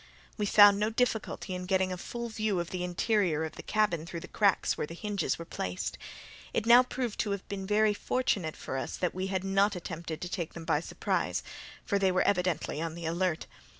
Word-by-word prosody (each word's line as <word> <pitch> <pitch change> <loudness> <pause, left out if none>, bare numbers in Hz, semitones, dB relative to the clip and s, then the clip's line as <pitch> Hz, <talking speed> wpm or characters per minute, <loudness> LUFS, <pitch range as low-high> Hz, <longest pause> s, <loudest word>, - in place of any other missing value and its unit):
We 210 -2 -1
found 205 0 +8
no 210 +1 +2
difficulty 225 -4 -1
in 180 0 -5
getting 190 -1 +2
a - - -2
full 235 +6 -5
view 215 -4 -1
of 170 0 -4
the 180 -1 -3
interior 180 -3 +1
of 160 - -5
the - - -7
cabin 205 -7 0
through 170 -1 -6
the - - -8
cracks 200 -4 +2
where - - -3
the 165 - -8
hinges 205 +1 -1
were 165 - -7
placed. 90 - -4 0.6
It - - 0
now 240 +2 +9
proved 250 -3 -3
to 215 - 0
have 200 -1 -3
been 195 -1 -5
very 210 +1 +3
fortunate 200 -8 -1
for 135 - -4
us - - -4
that 180 - -1
we 185 +1 -2
had 190 -1 -1
not 195 +1 +2
attempted 170 -2 -5
to 180 - -3
take 175 -2 -4
them 170 -1 -7
by 160 -3 +2
surprise, 165 - -1 0.4
for 200 - +1
they 190 -1 +3
were 185 - +2
evidently 180 -5 0
on 165 -1 -3
the 170 -1 -6
alert. 170 0 0
190 Hz, 220 wpm, -30 LUFS, 170-210 Hz, 0.6 s, now